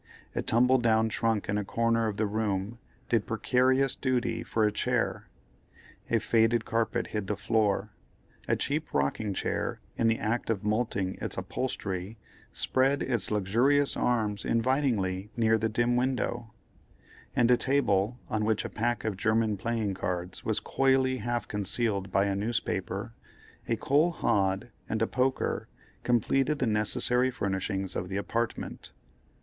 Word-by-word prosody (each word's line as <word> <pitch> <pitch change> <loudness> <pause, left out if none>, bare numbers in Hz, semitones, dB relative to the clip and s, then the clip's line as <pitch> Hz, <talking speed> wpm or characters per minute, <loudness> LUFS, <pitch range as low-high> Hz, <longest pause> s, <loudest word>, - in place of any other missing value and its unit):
A - - -1
tumble 125 +3 +3
down 110 -1 +3
trunk 110 -2 0
in 105 0 0
a - - -2
corner 115 +2 +1
of 105 -2 -3
the 110 - +1
room 105 +1 -2 0.3
did 115 -4 +1
precarious 130 +3 +2
duty 130 -3 0
for 110 - 0
a 105 - +2
chair; 105 - -1 0.8
a 115 - +3
faded 115 +1 +2
carpet 115 0 0
hid 105 -3 -4
the 105 - -1
floor; 110 -3 +1 0.6
a - - +2
cheap 150 +2 -2
rocking 95 +9 0
chair - - -2 0.2
in 115 - +2
the 115 0 +3
act 115 +2 -2
of 110 -3 -1
moulting 105 -3 -1
its - - -4
upholstery 100 -5 -3 0.3
spread 135 +2 +1
its 120 -7 0
luxurious 120 +8 +2
arms 110 -4 0
invitingly 115 -6 0
near 110 -1 +3
the 110 +1 0
dim 120 +2 +1
window; 125 -2 -1 0.8
and 120 0 +4
a - - +8
table, 120 -5 +1
on 110 -3 -1
which 110 0 +1
a - - -3
pack 120 -1 -1
of 110 -3 -1
German 110 +1 +2
playing 110 0 -1
cards 90 -1 -4
was 110 -2 +1
coyly 130 +2 +2
half 120 0 -2
concealed 100 -1 -1
by 100 +1 +3
a 100 - 0
newspaper, 105 0 -2 0.6
a 115 - +3
coal 145 +8 +3
hod, 100 - 0 0.2
and 110 0 0
a - - +1
poker, 130 +1 0 0.3
completed 135 +5 +2
the 130 - 0
necessary 120 +3 +1
furnishing 95 -3 -2
of 90 - -3
the 95 - -2
apartment. 115 +3 -3
110 Hz, 150 wpm, -29 LUFS, 105-125 Hz, 0.8 s, a